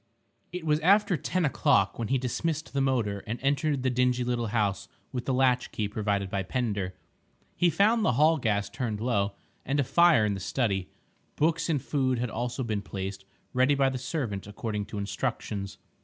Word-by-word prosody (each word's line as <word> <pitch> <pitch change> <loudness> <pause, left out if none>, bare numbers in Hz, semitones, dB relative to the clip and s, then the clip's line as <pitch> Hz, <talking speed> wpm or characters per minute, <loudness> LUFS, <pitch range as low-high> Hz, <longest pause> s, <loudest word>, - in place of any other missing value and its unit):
It 180 -1 -5
was 150 -1 +2
after 200 +3 +4
ten 175 +3 -1
o'clock 140 -8 +2
when 115 - -1
he 135 - +2
dismissed 155 +5 -2
the 140 - +1
motor 115 -7 0
and 115 +3 -2
entered 140 0 +1
the 130 - +2
dingy 125 0 +2
little 120 -1 -1
house 105 -3 0 0.2
with 125 -1 -4
the - - 0
latchkey 125 -4 +1
provided 100 -2 -1
by 100 0 -2
Pender. 100 -3 -2 0.6
He 175 - +3
found 210 +7 +3
the 125 - +3
hall 155 +5 +4
gas 100 -5 0
turned 110 -1 -3
low, 105 -4 0 0.3
and 140 +2 -1
a - - +4
fire 170 -3 +5
in 105 - 0
the 95 - -4
study. 95 -2 -1 0.5
Books 165 +2 +1
and 150 -3 +2
food 130 -1 0
had 120 -1 -2
also 120 +3 -3
been 110 -3 -2
placed 95 0 -6 0.3
ready 130 +3 +3
by 135 -1 +3
the 130 -1 -4
servant 125 - -3
according 105 0 -4
to 105 - -7
instructions. 100 0 -3
125 Hz, 185 wpm, -28 LUFS, 105-140 Hz, 0.6 s, fire